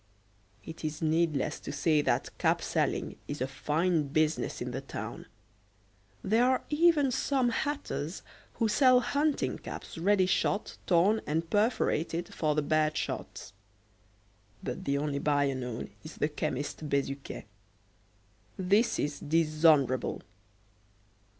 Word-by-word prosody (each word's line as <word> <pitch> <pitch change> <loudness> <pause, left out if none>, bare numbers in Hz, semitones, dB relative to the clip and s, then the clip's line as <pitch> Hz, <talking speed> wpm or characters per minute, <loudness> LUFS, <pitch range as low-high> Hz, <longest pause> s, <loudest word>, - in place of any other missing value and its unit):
It 160 0 -9
is 155 +1 -3
needless 160 -2 +1
to - - -6
say 150 +2 +2
that - - -1
cap - - +2
selling - - -1
is 145 - -4
a 130 - 0
fine 155 +3 0
business 155 +2 0
in - - -4
the - - -4
town. - - -7 1.0
There 225 +4 +3
are 255 0 +2
even 300 -3 +4
some 260 0 +1
hatters 235 - -3 0.3
who 225 - +1
sell 255 +3 +5
hunting 290 +3 0
caps - - -8
ready 195 +2 +3
shot, 195 +2 0
torn, 195 +5 +4
and 160 +2 -1
perforated 180 -6 0
for 155 -2 0
the 150 - +1
bad 155 +1 +1
shots; 100 - -5 1.1
but 190 - -5
the 140 0 +1
only 140 -1 -1
buyer 145 -2 +2
known 125 -4 -5
is 155 - -9
the 150 - +1
chemist 150 0 -3
Bezuquet. 140 0 -2 1.1
This 200 +5 +2
is 145 0 -2
dishonourable! 155 -4 +2
160 Hz, 125 wpm, -30 LUFS, 145-205 Hz, 1.1 s, sell